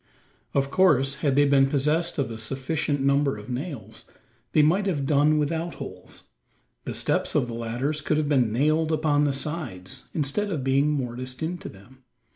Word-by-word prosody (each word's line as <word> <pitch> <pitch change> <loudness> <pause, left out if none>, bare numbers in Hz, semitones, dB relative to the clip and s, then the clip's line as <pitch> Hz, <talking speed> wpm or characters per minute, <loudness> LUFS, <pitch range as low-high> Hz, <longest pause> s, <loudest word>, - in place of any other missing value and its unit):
Of 135 0 +1
course, 140 -7 +3
had 140 -2 +1
they 145 +1 +5
been 140 -1 +4
possessed 150 +5 0
of 135 -5 -1
a 110 - -6
sufficient 140 +5 -2
number 140 -1 +2
of 105 +4 -9
nails, 125 - -6 0.5
they 155 - +4
might 185 +7 +2
have 145 -8 -1
done 150 +2 +3
without 160 +3 -1
holes. - - -9 0.6
The - - -4
steps - - 0
of - - +3
the 120 - -6
ladders 120 +6 -2
could 150 0 0
have 155 -1 0
been 130 -6 +2
nailed 155 +6 +2
upon 150 -2 +2
the 145 - +2
sides, 135 - -5
instead 160 +8 0
of 155 -8 -2
being 135 +2 +2
mortised 130 -1 -3
into 175 +2 -4
them. 120 +7 -17
140 Hz, 175 wpm, -25 LUFS, 130-155 Hz, 0.6 s, they